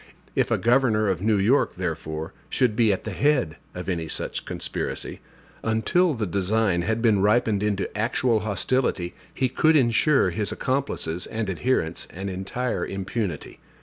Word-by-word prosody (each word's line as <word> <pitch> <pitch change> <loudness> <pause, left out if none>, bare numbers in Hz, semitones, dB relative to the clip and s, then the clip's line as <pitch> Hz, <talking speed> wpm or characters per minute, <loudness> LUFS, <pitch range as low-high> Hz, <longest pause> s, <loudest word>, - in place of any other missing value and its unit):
If - - +2
a - - +2
governor 115 -3 +3
of 90 -2 -1
New 105 0 +2
York, 115 +9 +2
therefore, 80 -3 -4 0.2
should 125 -5 +1
be 110 -1 +4
at 95 - -2
the - - -4
head 135 - +1 0.2
of 90 - -6
any 85 -4 -2
such - - -3
conspiracy, - - -4 0.4
until 150 +10 +2
the 110 -3 -1
design 100 0 +1
had 110 +6 -1
been 105 -4 +4
ripened 105 0 +3
into 100 -2 -1
actual 115 +1 +1
hostility 105 -3 -1 0.2
he 130 - 0
could 155 +5 +3
insure 135 +2 +3
his 105 -2 -1
accomplices 130 -10 -2
and 110 -3 -2
adherents 90 -5 -1
an 95 +3 -5
entire 95 +7 -2
impunity. 95 -3 -4
110 Hz, 150 wpm, -25 LUFS, 95-125 Hz, 0.4 s, be